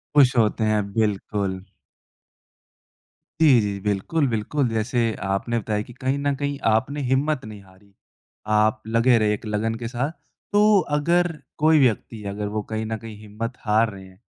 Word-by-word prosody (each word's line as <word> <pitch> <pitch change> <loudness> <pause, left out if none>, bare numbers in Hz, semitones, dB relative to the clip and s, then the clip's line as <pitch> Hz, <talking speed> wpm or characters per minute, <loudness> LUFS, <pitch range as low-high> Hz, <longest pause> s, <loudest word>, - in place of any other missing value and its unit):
खुश 135 -4 +6
होते 110 0 +2
हैं, 110 -1 +2
बिल्कुल। 100 -3 -1 1.8
जी, 140 -6 +7
जी, 100 -1 -3
बिल्कुल, 105 +10 0
बिल्कुल, 120 +5 -1
जैसे 115 +1 0
आपने 100 +5 -1
बताया 105 -1 -2
कि 120 - -13
कहीं 130 +3 -1
न 140 0 0
कहीं 140 0 -3
आपने 130 +7 0
हिम्मत 135 +2 0
नहीं 105 -2 -9
हारी, 95 +1 -22 0.5
आप 110 0 +2
लगे 115 +2 +4
रहे 105 -1 +2
एक 105 - -6
लगन 110 +1 -1
के 115 0 -5
साथ। 125 +5 -2 0.4
तो 210 0 +5 0.2
अगर 175 +3 +2 0.3
कोई 155 +1 +4
व्यक्ति 115 -3 0
अगर 105 +1 -4
वो 105 +1 -2
कहीं 110 0 -2
न 110 0 -3
कहीं 110 -1 -10
हिम्मत 110 +3 -5
हार 110 +1 +3
रहे 95 -1 -11
हैं, 95 0 -19
110 Hz, 165 wpm, -23 LUFS, 105-130 Hz, 1.8 s, जी